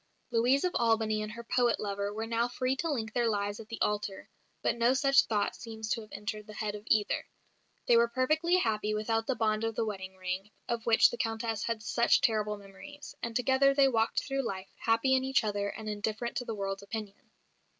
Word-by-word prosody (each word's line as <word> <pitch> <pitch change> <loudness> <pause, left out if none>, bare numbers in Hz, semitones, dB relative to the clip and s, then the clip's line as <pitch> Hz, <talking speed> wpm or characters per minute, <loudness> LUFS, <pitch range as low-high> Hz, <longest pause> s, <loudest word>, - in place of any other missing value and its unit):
Louise 245 +4 +3
of 365 - +1
Albany 220 -2 +2
and 215 0 -4
her 235 0 -8
poet 240 -1 +2
lover 200 -1 -2
were 220 +2 -4
now 230 +1 0
free 255 +1 -1
to 330 +5 -2
link 220 -7 -2
their 240 -2 +2
lives 205 -1 -1
at 220 - -10
the 230 - -6
altar 210 -2 -1 0.4
but - - +2
no 235 +2 +3
such 275 0 +5
thought 205 -2 0
seems 220 -2 -7
to 230 - 0
have 215 - -14
entered 210 +1 -5
the 215 - -10
head 215 -1 -2
of 210 - -7
either. 210 -2 +1 0.6
They 240 - +5
were 235 0 +5
perfectly 310 +8 +2
happy 215 -8 0
without 225 +1 -1
the 265 - +1
bond 215 -1 0
of 225 -1 -1
the 225 - 0
wedding 190 -3 -5
ring, 185 +2 -4 0.2
of 235 -1 -3
which 225 -1 +6
the 240 - -5
Countess 225 -1 -2
had 230 -2 -2
such 235 +2 +3
terrible 210 -2 +1
memories; 205 +11 -11
and 235 -1 -4
together 265 +2 +3
they 275 -1 +6
walked 225 -2 +1
through 275 -1 -1
life, 195 -6 -5
happy 230 +4 +2
in 260 0 +3
each 265 -1 +2
other 205 -1 -1
and 220 +1 -7
indifferent 215 +3 -3
to 245 - -2
the 225 - -4
world's 195 -1 -3
opinion. 205 0 -7
225 Hz, 215 wpm, -30 LUFS, 210-240 Hz, 0.6 s, which